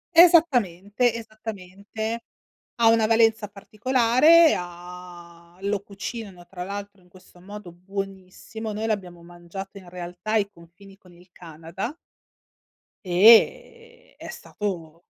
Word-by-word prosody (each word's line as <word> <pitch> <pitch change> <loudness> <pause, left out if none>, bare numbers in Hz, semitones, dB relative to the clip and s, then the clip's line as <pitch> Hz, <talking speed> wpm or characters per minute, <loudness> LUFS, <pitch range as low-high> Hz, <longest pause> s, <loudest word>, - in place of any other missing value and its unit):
Esattamente, 245 - +4
esattamente, 220 0 -7 0.5
ha 230 -1 +3
una 225 -1 +4
valenza 225 -1 +3
particolare, 250 - +4
ha 175 -1 -11
lo 200 0 -1
cucinano 200 -2 -8
tra 180 -2 -7
l'altro 200 0 -8
in 180 - -25
questo 185 -1 -19
modo 200 -1 -10
buonissimo. 195 +4 -7
Noi 220 +2 -3
l'abbiamo 180 -5 -4
mangiato 175 +3 -10
in 185 -3 -13
realtà 175 +3 -7
ai 205 -2 +1
confini 195 +2 -18
con 180 -3 -20
il 175 +1 -20
Canada 170 - -8 1.1
e 465 - +3
è - - -10
stato 170 -5 -6
200 Hz, 110 wpm, -24 LUFS, 180-225 Hz, 1.1 s, Esattamente